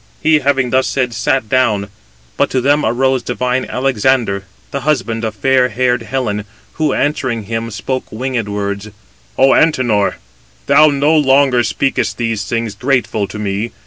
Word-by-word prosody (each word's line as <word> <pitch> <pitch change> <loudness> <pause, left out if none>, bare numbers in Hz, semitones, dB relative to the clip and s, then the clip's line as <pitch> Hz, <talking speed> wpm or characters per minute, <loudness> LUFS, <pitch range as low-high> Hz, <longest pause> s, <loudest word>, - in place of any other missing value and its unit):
He, 155 -1 +4
having 135 -3 +1
thus 130 0 +2
said, 125 -3 -1
sat 115 +2 0
down; 105 -5 +1 0.5
but - - +1
to 130 - 0
them 145 +4 +2
arose 130 +3 +1
divine 125 +1 -1
Alexander, 125 -5 0 0.3
the 140 - -2
husband 120 -5 -1
of 110 -1 -3
fair 130 +4 +2
haired 125 +1 0
Helen, 115 -4 -3 0.3
who 155 -2 0
answering 130 -6 -1
him 115 +2 -4
spoke 115 +5 -4
winged 120 -2 -3
words: 100 0 -3 0.5
"O 135 +1 +5
Antenor, 115 - +2 0.5
thou 155 - +6
no 145 +2 +2
longer 135 -4 +4
speakest 135 +3 -1
these 115 -3 -2
things 115 0 -2
grateful 120 -3 0
to - - -8
me. 105 +2 -3
125 Hz, 150 wpm, -16 LUFS, 110-135 Hz, 0.5 s, thou